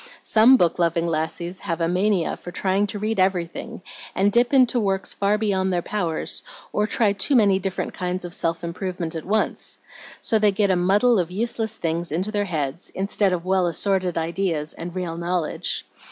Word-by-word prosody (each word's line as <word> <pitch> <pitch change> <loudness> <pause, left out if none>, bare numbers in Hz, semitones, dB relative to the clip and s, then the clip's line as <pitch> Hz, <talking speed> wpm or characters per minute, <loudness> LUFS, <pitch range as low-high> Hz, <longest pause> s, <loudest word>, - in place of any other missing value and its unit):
"Some 230 +4 +6
book 175 -5 +1
loving 170 0 +1
lassies 170 +2 -3
have 165 0 -3
a 165 - +1
mania 185 0 +1
for - - -10
trying 195 +3 0
to 205 - -5
read 215 0 -2
everything, 185 +3 -1 0.3
and 200 +2 +3
dip 240 +2 +3
into 255 -3 +4
works 195 -3 -1
far 205 +1 +1
beyond 190 -3 0
their 175 -1 0
powers, 175 -6 -2 0.3
or 210 0 +1
try 210 -1 +2
too 200 +8 +1
many 200 -5 +4
different 195 -1 -3
kinds 180 0 -3
of 175 - -5
self 165 -1 -1
improvement 175 -1 -4
at 160 - -5
once. 215 +3 0 0.4
So 220 - +1
they 210 -1 +4
get 200 0 +2
a - - +3
muddle 200 +6 +3
of 175 -2 -1
useless 220 +3 -1
things 165 0 -2
into 185 +7 -1
their 205 -1 0
heads, 155 -2 -3
instead 195 0 +1
of 180 -1 -2
well 185 -1 +2
assorted 185 +1 0
ideas 165 -2 -1
and 175 +1 -7
real 175 -3 -3
knowledge. 170 -1 -2
185 Hz, 185 wpm, -23 LUFS, 170-205 Hz, 0.4 s, Some